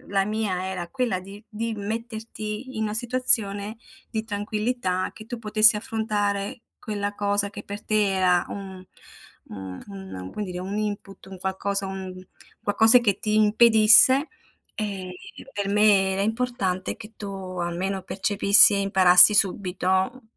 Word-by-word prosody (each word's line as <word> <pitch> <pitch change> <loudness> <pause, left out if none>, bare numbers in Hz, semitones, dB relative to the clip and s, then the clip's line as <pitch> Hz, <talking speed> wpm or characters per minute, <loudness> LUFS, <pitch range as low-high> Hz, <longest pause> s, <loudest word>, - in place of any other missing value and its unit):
uhm, - - -18
la 195 -1 +1
mia 205 -3 -3
era 185 -2 -5
quella 235 -5 -2
di 200 +3 -13
di 225 +1 -5
metterti 220 +2 -7
in 220 - -2
una 210 - -4
situazione 220 -3 +2 0.3
di 220 -1 -4
tranquillità, 210 -2 -3
che 215 - -13
tu 240 0 -7
potessi 215 0 +4
affrontare 210 -1 -3 0.2
quella 205 -2 -4
cosa 205 0 -1
che 205 0 -9
per 205 +1 -9
te 215 -2 +1
era 180 -2 +2
un, 190 -2 -9 0.6
uhm, 95 -2 -10
un, 190 - -9
come 210 - -5
dire, 180 -2 -7
un 195 +3 -5
input, 205 -2 -6
un 190 - -11
qualcosa 195 +1 -3
un 190 -1 -7 0.5
qualcosa 220 +4 +6
che 210 -5 -1
ti 215 0 -1
impedisse, 225 +5 +6 0.5
ehm, 195 -4 -5 0.4
per 200 -1 -4
me 200 -2 +3
era 195 - -1
importante 215 -5 -3
che 220 0 -13
tu 205 - -8 0.3
almeno 180 +3 -3
percepissi 200 +2 +4
e 200 - 0
imparassi 190 0 +6
subito 190 +4 0
205 Hz, 145 wpm, -23 LUFS, 190-220 Hz, 0.6 s, qualcosa